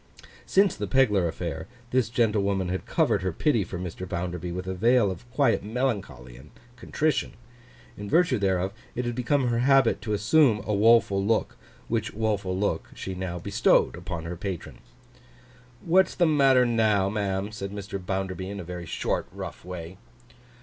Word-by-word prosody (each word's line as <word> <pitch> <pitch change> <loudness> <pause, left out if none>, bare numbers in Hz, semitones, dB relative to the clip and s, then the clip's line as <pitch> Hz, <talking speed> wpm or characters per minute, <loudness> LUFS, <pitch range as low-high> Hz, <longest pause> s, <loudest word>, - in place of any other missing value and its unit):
Since 195 0 +3
the - - -4
Pegler 105 -10 +3
affair, 80 -1 -5 0.2
this 130 -3 +2
gentlewoman 100 -5 +1
had 95 +1 -4
covered - - +1
her 95 0 -1
pity 115 - +1
for 90 - -6
Mr. 90 0 -6
Bounderby 90 0 -4
with 90 +1 -5
a 95 - -3
veil 115 +2 +3
of 95 +7 -10
quiet 135 +2 +2
melancholy 105 - -3
and 70 +4 -15 0.3
contrition. 150 +6 -1 0.6
In 100 0 -7
virtue 165 - +3
thereof, 95 -1 0 0.2
it 125 - -2
had 120 - -2
become 125 +2 +1
her 115 -1 0
habit 135 -1 +3
to 105 -2 -3
assume 110 +1 +3
a 105 - -1
woful 105 -2 +4
look, 110 +2 0 0.3
which - - -2
woful 100 -4 -1
look 100 +1 -1
she 95 - -5
now 90 -1 -4
bestowed - - +2
upon 85 -2 -6
her 85 +2 -5
patron. 90 0 -6 1.1
'What's 185 +2 +3
the 175 - +3
matter 135 -5 +4
now, 110 -4 +2
ma'am?' 100 -1 -2
said 100 -2 -5
Mr. 100 -2 -6
Bounderby, 95 0 -3
in 100 0 -6
a - - -5
very 90 0 -7
short, - - -2
rough - - -8
way. 90 0 -8
100 Hz, 165 wpm, -26 LUFS, 90-120 Hz, 1.1 s, woful